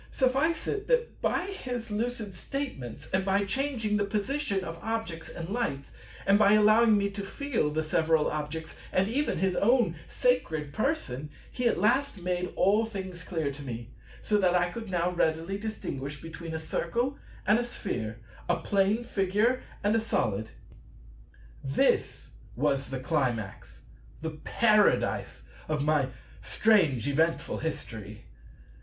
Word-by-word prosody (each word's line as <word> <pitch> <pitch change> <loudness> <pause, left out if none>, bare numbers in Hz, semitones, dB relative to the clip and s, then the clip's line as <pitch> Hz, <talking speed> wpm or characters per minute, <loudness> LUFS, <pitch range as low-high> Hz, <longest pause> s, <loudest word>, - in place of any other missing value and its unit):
Suffice 270 +5 +1
it, 410 -1 -2
that 485 -1 +1
by 355 - +1
his 245 - -5
lucid 220 -1 -2
statements, 185 - -5
and 190 0 +2
by 195 +1 +2
changing 225 -2 0
the 205 - +2
position 205 +1 -1
of 165 -1 -6
objects 220 -7 -3
and 165 - -6
lights, 195 - -2 0.3
and 200 +1 +5
by 205 -1 +6
allowing 215 +1 +6
me 200 0 0
to 200 0 -5
feel 245 - -1
the 155 +1 -1
several 160 0 +2
objects 155 +1 -4 0.2
and 185 +1 +2
even 280 +7 0
his 185 +1 +1
own 240 +3 +3
sacred 155 - 0
Person, 150 - -1 0.2
he 250 -1 0
at - - +2
last 255 +4 +2
made 180 0 -2
all 210 +4 +4
things 190 -5 -5
clear 160 -6 -2
to 140 +1 -9
me, 120 -3 -6 0.3
so 210 -1 +2
that 180 -2 +3
I 180 0 +2
could 225 +1 -6
now 175 -1 +1
readily 165 +3 0
distinguish 145 -10 -5
between 165 +1 -7
a - - 0
Circle 240 - -1 0.3
and 210 +3 +5
a - - 0
Sphere, 120 - -4 0.3
a - - +4
Plane 200 +3 +1
Figure 215 +3 +1 0.2
and 205 +2 +3
a - - +4
Solid. 110 - -1 1.1
This 65 - +1 0.2
was 135 0 0
the 135 -1 -3
Climax, 125 - -2 0.4
the 160 0 -3
Paradise, 210 - +2 0.3
of 150 -2 0
my 150 -3 +3 0.3
strange 165 - +3
eventful 160 +4 +1
History. 110 -10 -5
190 Hz, 145 wpm, -29 LUFS, 155-225 Hz, 1.1 s, by